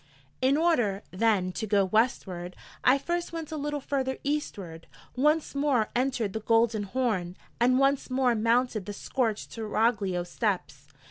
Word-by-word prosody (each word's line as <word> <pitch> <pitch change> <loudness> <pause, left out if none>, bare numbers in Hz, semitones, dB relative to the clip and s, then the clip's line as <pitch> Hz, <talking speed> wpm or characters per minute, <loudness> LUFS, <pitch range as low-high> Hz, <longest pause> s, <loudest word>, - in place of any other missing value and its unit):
In 265 +2 +3
order, 245 - +1
then, 190 -2 +1
to 220 +4 -4
go 200 -1 +3
Westward, 185 -4 0 0.3
I 255 +2 +5
first 345 +5 -3
went 325 -2 -6
a - - -3
little 295 0 -2
further 265 -1 -2
Eastward, 200 - -4 0.3
once 300 +4 +2
more 280 -6 +1
entered 245 -5 0
the 220 - -2
Golden 225 0 +2
Horn, 195 -6 -1 0.2
and 250 +2 +4
once 275 +1 +2
more 255 -1 +2
mounted 230 -2 +1
the 205 - -4
scorched 225 0 -2
Seraglio 210 -4 0
steps. 175 - -3
230 Hz, 145 wpm, -28 LUFS, 200-270 Hz, 0.3 s, I